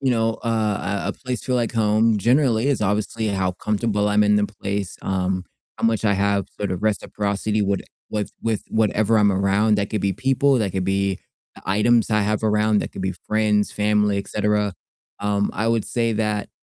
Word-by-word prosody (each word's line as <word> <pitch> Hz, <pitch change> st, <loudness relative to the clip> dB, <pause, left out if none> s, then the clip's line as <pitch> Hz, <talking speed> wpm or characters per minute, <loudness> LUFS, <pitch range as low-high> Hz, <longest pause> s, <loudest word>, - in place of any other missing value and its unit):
you 135 Hz, -2 st, +1 dB
know, 115 Hz, -2 st, +1 dB
uh, 105 Hz, -3 st, -1 dB
a -, -, -1 dB
a -, -, -1 dB
place 125 Hz, -4 st, -5 dB
feel 130 Hz, -, -1 dB
like 120 Hz, -1 st, -1 dB
home 110 Hz, 0 st, +2 dB
generally 120 Hz, +1 st, +2 dB
is 140 Hz, -5 st, +1 dB
obviously 105 Hz, +2 st, -1 dB
how 95 Hz, -2 st, 0 dB
comfortable 105 Hz, +1 st, -1 dB
I'm 105 Hz, 0 st, +3 dB
in 105 Hz, 0 st, +4 dB
the 105 Hz, 0 st, +2 dB
place, 100 Hz, -2 st, -4 dB
um, 95 Hz, -1 st, -1 dB, 0.3 s
how -, -, -3 dB
much 110 Hz, -1 st, 0 dB
I 105 Hz, -, +3 dB
have 100 Hz, -1 st, +1 dB
sort 100 Hz, -, -2 dB
of 90 Hz, -, -5 dB
reciprocity 105 Hz, 0 st, -1 dB
would 100 Hz, 0 st, 0 dB, 0.3 s
with 105 Hz, -1 st, -2 dB
with 110 Hz, -2 st, -1 dB
whatever 110 Hz, 0 st, +2 dB
I'm 105 Hz, -1 st, +4 dB
around; 100 Hz, +3 st, +2 dB
that 100 Hz, 0 st, -2 dB
could 110 Hz, -, -1 dB
be 100 Hz, 0 st, 0 dB
people, 135 Hz, +4 st, +2 dB
that 100 Hz, -4 st, -1 dB
could 95 Hz, -1 st, -1 dB
be, 95 Hz, 0 st, 0 dB, 0.4 s
uh, -, -, -12 dB
items 110 Hz, +4 st, +2 dB
I 105 Hz, 0 st, +3 dB
have 105 Hz, +2 st, -1 dB
around, 105 Hz, 0 st, +2 dB
that -, -, -4 dB
could -, -, -6 dB
be 95 Hz, 0 st, -1 dB
friends, 105 Hz, -1 st, +1 dB
family, 105 Hz, -1 st, +1 dB
et 100 Hz, -, -6 dB
cetera, 105 Hz, -2 st, 0 dB, 0.5 s
um, 100 Hz, 0 st, 0 dB
I 115 Hz, -, -1 dB
would 115 Hz, -2 st, +1 dB
say 115 Hz, -1 st, 0 dB
that 105 Hz, -1 st, -1 dB
105 Hz, 200 wpm, -22 LUFS, 100-110 Hz, 0.5 s, in